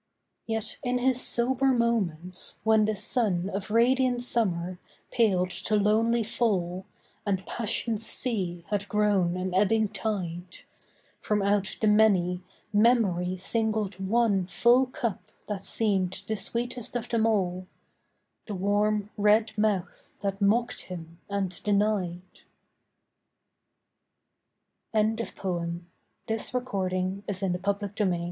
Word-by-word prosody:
Yet 225 -1 -3
in 250 -1 0
his 255 0 +2
sober 260 +3 +4
moments, 205 -9 0
when 220 -1 +4
the 215 0 -1
sun 200 -3 +2
Of 195 +1 -4
radiant 245 +2 +2
summer 185 -7 0 0.3
paled 185 -6 +1
to 215 - -2
lonely 225 +3 +2
fall, 190 -5 -2 0.4
And 190 -3 -2
passion's 225 -1 +1
sea 185 -9 +3
had 205 -1 -2
grown 200 -4 +1
an 185 0 -3
ebbing 210 +3 +2
tide, 180 -5 -4 0.6
From 210 -1 -1
out 200 -1 0
the 215 - +2
many, 195 -4 +3 0.3
Memory 205 -5 +2
singled 215 0 -1
one 195 -2 +1
Full 245 +6 +3
cup 215 -5 -5 0.2
that 200 -2 -5
seemed 195 -5 0
the 220 - -2
sweetest 240 +3 -2
of 240 -1 -3
them 225 -1 +1
all— 185 -4 -1 0.8
The 210 - -4
warm 205 +2 0
red 215 +1 +2
mouth 205 -4 -2
that 195 0 -3
mocked 225 +4 +1
him 165 -2 -9
and 195 -2 -3
denied. 200 -4 0 2.7
HELEN 220 +1 +2
OF - - -7
TROY 185 -3 -3
ON 170 +1 -5 0.4
THE 220 - -1
ISLE 225 +3 -1
OF - - -16
CRANAE 185 -2 -2
The 195 +1 -2
world 185 -4 +1
205 Hz, 125 wpm, -27 LUFS, 185-225 Hz, 2.7 s, sober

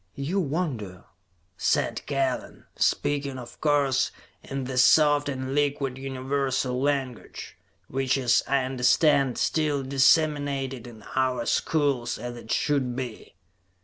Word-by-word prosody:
"You 155 +8 -1
wonder," 135 - -3 0.5
said - - 0
Kellen, 135 -2 -2
speaking 140 -2 0
of 120 -2 -11
course, 140 -3 +2 0.3
in 135 0 -4
the 130 0 -2
soft 145 +2 +5
and 130 -1 -4
liquid 140 -2 0
universal 135 -1 -1
language, 135 -4 -3 0.3
which 135 +1 0
is, 125 -2 +3
I 140 -1 +2
understand, 135 +1 +3
still 150 -3 0
disseminated 140 -2 +2
in 110 -3 -12
our 130 -2 +1
schools, 140 -6 0
as 120 0 -6
it 115 -1 -9
should 135 -4 0
be. 125 -7 -7
135 Hz, 115 wpm, -26 LUFS, 125-145 Hz, 0.5 s, soft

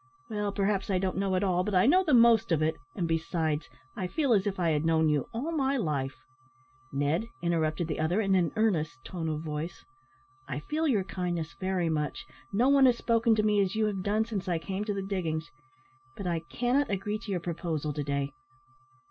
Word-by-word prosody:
"Well, 210 -1 -1
perhaps 195 0 0
I 190 - +2
don't 185 0 -1
know 195 -1 +1
it 185 - +1
all, 180 -2 +2
but 205 0 -2
I 180 - +5
know 360 +9 +5
the 305 -7 +3
most 230 -4 +5
of 155 -2 +3
it, 160 +1 +1 0.2
and 175 -4 -1
besides, 165 -1 -1 0.3
I 185 - -2
feel 280 - +1
as 205 -1 +2
if 195 -2 -2
I 170 -2 +2
had 150 0 +1
known 160 -1 +3
you 150 -2 +1
all 255 +8 -3
my 275 -3 +1
life 140 - -1 0.4
" 130 - -32 0.3
"Ned," 145 +10 0 0.2
interrupted 165 -1 0
the 155 - -3
other, 165 +6 +1
in 195 -3 +2
an 180 -3 +3
earnest 165 -10 +1
tone 165 -3 -4
of 155 -1 -2
voice, 155 +2 -5 0.6
"I - - -3
feel 315 +2 -1
your 215 -9 +2
kindness 175 -5 -3
very 185 -2 0
much 155 +8 -2 0.3
no 235 +6 +3
one 275 -1 +6
has 245 -2 +3
spoken 230 -1 +3
to 215 - +1
me 210 -1 +3
as 195 0 0
you 220 0 +2
have 200 -3 -1
done 210 +3 +1
since 205 -4 -4
I 175 -2 +1
came 190 +4 -3
to 210 - -1
the 195 - -2
diggings 170 -4 -3 0.7
but 200 - -6
I 170 -2 0
cannot 255 +4 +1
agree 205 +2 -2
to 225 - -10
your 185 -3 0
proposal 165 -3 -3
to 145 - -3
day. 140 0 -1
185 Hz, 215 wpm, -29 LUFS, 160-215 Hz, 0.7 s, one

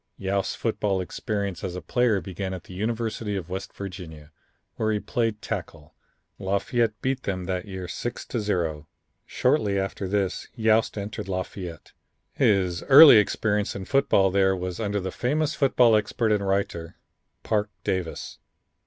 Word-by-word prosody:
Yost's 95 0 -1
football 105 -4 -1
experience 100 0 -3
as 90 -2 -3
a - - -3
player 120 -5 +2
began 95 0 -4
at 90 - -9
the - - -12
University 110 +1 -2
of 90 -2 -5
West 95 - -5
Virginia, 85 -6 -9 0.4
where 110 -1 0
he 105 - 0
played 115 -1 -2
tackle. 75 -2 -6 0.5
Lafayette 105 +3 0
beat 130 0 0
them 95 -5 -3
that 90 0 -2
year 95 -2 -6
6 120 +7 -5
to 120 - -3
0. 85 -7 -2 0.4
Shortly 115 -7 +1
after 95 0 -2
this 100 -1 -1
Yost 110 -2 +2
entered 100 0 -5
Lafayette. 90 -3 -5 0.4
His 90 -4 +2
early 140 -2 +11
experience 105 0 +1
in 95 - -5
football 100 -8 +3
there 95 0 +3
was 90 +1 -4
under 105 -2 -1
the 95 -1 -4
famous 150 - 0
football 125 -6 +4
expert 110 +1 +1
and 100 -2 +1
writer, 90 -4 -1 0.5
Parke 105 -1 0
Davis. 90 -3 -3
100 Hz, 150 wpm, -25 LUFS, 95-110 Hz, 0.5 s, early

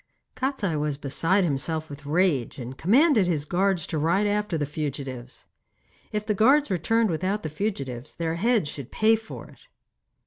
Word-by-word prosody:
Kostiei 255 - -1
was 150 -1 -1
beside 165 +8 +2
himself 160 +1 -1
with 145 -1 -10
rage, 155 -6 +1
and 125 0 -7
commanded 225 - +4
his 155 -5 0
guards 180 0 +1
to 160 - -2
ride 170 +7 +2
after 205 -4 0
the 150 - -1
fugitives. 140 -4 -5 0.7
If 210 0 -2
the 215 - +1
guards 265 +5 +4
returned 215 +5 +1
without 185 +6 -1
the 155 - -3
fugitives, 145 - -4
their 165 -1 -2
heads 215 0 +1
should 140 -3 -7
pay 220 +1 +4
for 220 0 -9
it. - - -18
170 Hz, 165 wpm, -25 LUFS, 145-210 Hz, 0.7 s, commanded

